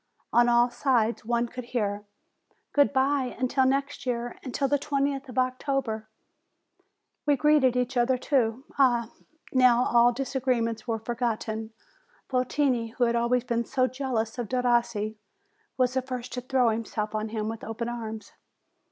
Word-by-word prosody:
On 240 Hz, 0 st, +5 dB
all 240 Hz, 0 st, +4 dB
sides 240 Hz, -3 st, +1 dB
one 235 Hz, +1 st, +1 dB
could 250 Hz, +1 st, -7 dB
hear: 210 Hz, -4 st, -2 dB, 0.7 s
"Good 285 Hz, -1 st, +4 dB
bye 270 Hz, -1 st, +1 dB
until 260 Hz, +1 st, +2 dB
next 275 Hz, +1 st, -1 dB
year! 240 Hz, -1 st, -2 dB
Until 275 Hz, +1 st, -1 dB
the 285 Hz, +1 st, +1 dB
twentieth 275 Hz, -1 st, -1 dB
of 250 Hz, -, -9 dB
October 255 Hz, -4 st, -1 dB, 0.6 s
!" 400 Hz, +3 st, -46 dB
We 290 Hz, -, +5 dB
greeted 290 Hz, -3 st, +4 dB
each 250 Hz, +1 st, -1 dB
other, 250 Hz, +1 st, +3 dB
too. 250 Hz, -2 st, 0 dB, 0.2 s
Ah! 240 Hz, -4 st, +3 dB, 0.4 s
now 250 Hz, -2 st, +5 dB
all 240 Hz, 0 st, +5 dB
disagree 260 Hz, -1 st, -1 dB
ments 230 Hz, -1 st, -3 dB
were 225 Hz, -1 st, 0 dB
forgotten! 225 Hz, -1 st, -3 dB, 0.6 s
Votini, 255 Hz, -2 st, 0 dB
who 250 Hz, -, 0 dB
had 235 Hz, 0 st, +2 dB
always 235 Hz, +1 st, +2 dB
been 235 Hz, -2 st, -1 dB
so 255 Hz, +2 st, +1 dB
jealous 255 Hz, -3 st, -2 dB
of 235 Hz, -, -3 dB
Derossi, 235 Hz, -4 st, +1 dB, 0.6 s
was 255 Hz, -1 st, +2 dB
the 260 Hz, -, +1 dB
first 255 Hz, -1 st, -6 dB
to 250 Hz, -, -3 dB
throw 255 Hz, -1 st, +2 dB
himself 220 Hz, -1 st, -3 dB
on 215 Hz, 0 st, -2 dB
him 215 Hz, -1 st, -3 dB
with 225 Hz, 0 st, -5 dB
open 225 Hz, +1 st, -4 dB
arms. 220 Hz, -3 st, -6 dB
245 Hz, 155 wpm, -27 LUFS, 230-260 Hz, 0.7 s, On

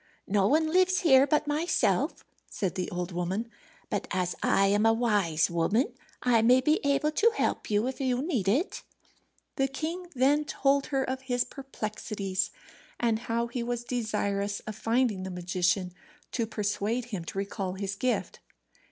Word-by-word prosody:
"No 195 Hz, -1 st, +2 dB
one 315 Hz, +4 st, +2 dB
lives 370 Hz, +1 st, +3 dB
here 275 Hz, -4 st, +6 dB
but 300 Hz, +1 st, +2 dB
myself," 300 Hz, +4 st, 0 dB, 0.2 s
said 190 Hz, -3 st, -2 dB
the 185 Hz, -2 st, -3 dB
old 180 Hz, +1 st, -4 dB
woman. 185 Hz, +7 st, -2 dB, 0.4 s
"But -, -, -3 dB
as 180 Hz, -1 st, -1 dB
I 195 Hz, -, +3 dB
am 205 Hz, +2 st, +3 dB
a 225 Hz, 0 st, +5 dB
wise 205 Hz, -9 st, +2 dB
woman 200 Hz, -, +1 dB, 0.3 s
I 240 Hz, -3 st, +4 dB
may 245 Hz, +3 st, +6 dB
be 305 Hz, +5 st, +2 dB
able 285 Hz, +2 st, +2 dB
to 445 Hz, +9 st, +3 dB
help -, -, -1 dB
you 210 Hz, +1 st, +2 dB
if 265 Hz, +2 st, -4 dB
you 255 Hz, -2 st, +1 dB
need 260 Hz, -, -1 dB
it." 275 Hz, -, +1 dB, 0.8 s
The 270 Hz, -, +2 dB
king 325 Hz, +6 st, -4 dB
then 280 Hz, +4 st, +3 dB
told 275 Hz, -1 st, +1 dB
her 270 Hz, -2 st, 0 dB
of 260 Hz, 0 st, -3 dB
his 245 Hz, -2 st, 0 dB
perplexities, 215 Hz, -7 st, -4 dB, 0.5 s
and 230 Hz, -2 st, +1 dB
how 235 Hz, +1 st, +1 dB
he 235 Hz, +1 st, -4 dB
was 240 Hz, 0 st, -2 dB
desirous 205 Hz, -4 st, -1 dB
of 215 Hz, -1 st, -7 dB
finding 225 Hz, -2 st, +1 dB
the 190 Hz, -, -5 dB
magician, 180 Hz, 0 st, 0 dB, 0.4 s
to 230 Hz, -3 st, -1 dB
persuade 215 Hz, +2 st, -1 dB
him 180 Hz, -4 st, -3 dB
to 195 Hz, -, -7 dB
recall 195 Hz, -1 st, -3 dB
his 195 Hz, 0 st, -3 dB
gift. 210 Hz, -2 st, -1 dB
230 Hz, 165 wpm, -28 LUFS, 195-270 Hz, 0.8 s, here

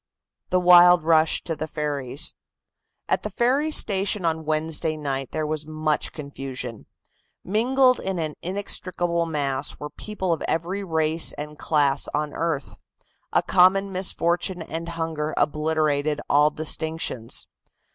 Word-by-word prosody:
THE 185 Hz, -, +2 dB
WILD 180 Hz, -1 st, +7 dB
RUSH 160 Hz, -1 st, +3 dB
TO 165 Hz, -, -3 dB
THE 155 Hz, +1 st, -4 dB
FERRIES. 145 Hz, -3 st, -2 dB, 0.7 s
At -, -, +1 dB
the -, -, -4 dB
ferry 265 Hz, +5 st, +1 dB
station 200 Hz, -, +2 dB
on 160 Hz, -1 st, -1 dB
Wednesday 155 Hz, 0 st, -1 dB
night 135 Hz, -3 st, -3 dB
there 155 Hz, -1 st, -3 dB
was 155 Hz, 0 st, -4 dB
much 155 Hz, -1 st, -1 dB
confusion. 135 Hz, -5 st, -7 dB, 0.6 s
Mingled 255 Hz, +5 st, +2 dB
in 190 Hz, -1 st, -3 dB
an 155 Hz, -2 st, -3 dB
inextricable 175 Hz, -2 st, -2 dB
mass 145 Hz, -3 st, 0 dB
were 150 Hz, -, -7 dB
people 190 Hz, -5 st, -3 dB
of 160 Hz, -, -4 dB
every 180 Hz, +5 st, -2 dB
race 160 Hz, -2 st, +1 dB
and 150 Hz, +1 st, -7 dB
class 145 Hz, -3 st, +2 dB
on 150 Hz, 0 st, -2 dB
earth. 160 Hz, -4 st, -3 dB, 0.6 s
A -, -, +2 dB
common 195 Hz, +2 st, +4 dB
misfortune 180 Hz, -1 st, 0 dB
and 165 Hz, +1 st, -6 dB
hunger 160 Hz, -2 st, -3 dB
obliterated 150 Hz, -1 st, 0 dB
all 150 Hz, +1 st, +4 dB
distinctions. 155 Hz, -6 st, -2 dB
160 Hz, 130 wpm, -24 LUFS, 150-180 Hz, 0.7 s, WILD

